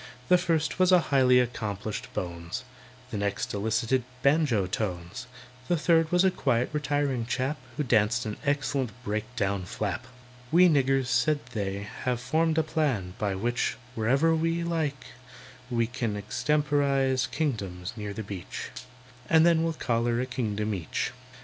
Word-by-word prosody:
The 180 - +7
first 160 -1 0
was 185 0 +5
a 180 - +8
highly 130 -5 +4
accomplished 110 -4 -3
"bones," 85 +3 -4 0.5
The 105 - -2
next 100 0 -2
elicited 110 +5 +1 0.2
banjo 140 - +3
tones, 90 +3 -4 0.4
The 175 - +2
third 165 0 +3
was 180 +1 +4
a 190 - +4
quiet, 130 -7 0
retiring 145 -5 0
chap, 135 +4 -1 0.2
Who 150 - +1
danced 115 -1 +2
an 105 -1 -4
excellent 140 -3 0
break 105 0 -2
down 100 -4 -1
"flap." 105 +5 -3 0.4
"We 180 +2 +7
niggers," 135 -4 +3
said 130 +4 +2
they, 100 -1 -3 0.2
"have 125 -2 +1
formed 160 +5 +1
a 160 - +4
plan 135 - -1
By 100 -2 0
which, 120 +5 -1 0.2
whenever 135 +8 +2
we 165 +1 0
like, 160 -5 -2 0.6
we 115 -2 +1
can 115 -3 -3
Extemporise 135 +2 +1
kingdoms 100 - -3
near 105 -2 -5
the 110 +2 -5
beach, 100 -3 -6 0.6
And 160 0 +6
then 170 -1 +4
we'll 165 0 0
collar 120 -4 0
a 125 - 0
kingdom 110 -4 -2
each. 85 -6 -2
125 Hz, 150 wpm, -28 LUFS, 105-150 Hz, 0.6 s, a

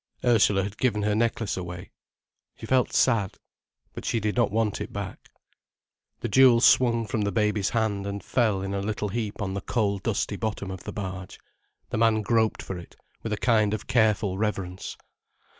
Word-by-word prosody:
Ursula 105 -5 +4
had 100 +2 -6
given 105 -5 +1
her 105 0 +1
necklace 115 -1 0
away. 90 -1 -7 0.7
She - - -8
felt 130 -2 +2
sad. 115 -7 +2 0.6
But - - -7
she 115 - 0
did 105 -1 -1
not 120 -1 +3
want 110 0 0
it - - -5
back. - - -7 0.9
The - - -1
jewel 125 +1 +6
swung 115 -1 +4
from 115 -2 -2
the 100 0 0
baby's 105 0 +1
hand 105 -3 -1
and 100 0 -5
fell 110 -6 +1
in 95 0 -3
a 100 - -1
little 105 0 -2
heap 105 0 -3
on 95 -1 -3
the 100 - -3
coal 100 -4 0
dusty - - -2
bottom 105 -3 -3
of 95 -1 -8
the - - -4
barge. 95 -2 -6 0.5
The - - -1
man 110 -1 +3
groped 110 0 +1
for 95 -2 -5
it, 85 - -13 0.3
with 110 - -5
a 105 - 0
kind 110 -2 +2
of 105 - -8
careful 105 -5 +2
reverence. 95 -4 -3
105 Hz, 185 wpm, -26 LUFS, 100-115 Hz, 0.9 s, jewel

